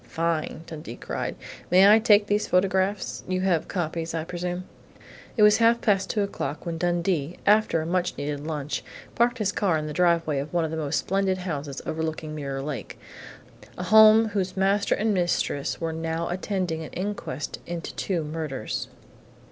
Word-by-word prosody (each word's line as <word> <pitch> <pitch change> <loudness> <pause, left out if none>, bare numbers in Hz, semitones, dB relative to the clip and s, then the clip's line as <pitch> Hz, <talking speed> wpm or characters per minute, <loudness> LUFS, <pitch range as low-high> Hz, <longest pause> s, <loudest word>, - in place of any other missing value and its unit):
"Fine!" 165 -1 -2
Dundee 150 -8 -8
cried. - - -4 0.3
"May 185 +2 +7
I 215 +2 +8
take 210 -2 +5
these 205 0 0
photographs?... 190 +2 +1
You 185 0 -1
have 180 -4 +1
copies, 165 -2 -3
I 160 - -1
presume?" 180 +1 -4 0.7
It 215 - +5
was 210 0 +7
half 230 0 +4
past 200 -4 +1
two 210 - +1
o'clock 155 -6 -4
when 165 -1 -3
Dundee, 175 -2 0
after 210 -6 +3
a - - -6
much 180 +1 -1
needed 145 0 -3
lunch, 150 -1 -4 0.3
parked 240 +1 +2
his 210 -4 0
car 190 -6 +1
in 155 - -3
the 150 - -5
driveway 170 -4 +2
of 145 +2 -5
one 170 -2 +1
of 155 - -4
the - - -3
most 155 -1 -1
splendid 195 -1 0
houses 150 -6 -5
overlooking 160 -1 -3
Mirror 140 -2 -4
Lake 145 -3 -5 0.8
a 180 - -4
home 220 +3 +7
whose 190 -2 -2
master 195 +1 +2
and 215 0 +1
mistress 175 -6 0
were 165 -1 -2
now 165 +1 -2
attending 180 -3 -2
an 155 - -7
inquest 185 -8 -4
into 170 -1 -5
two 175 -5 -2
murders.... 150 -6 -4
175 Hz, 170 wpm, -25 LUFS, 155-195 Hz, 0.8 s, I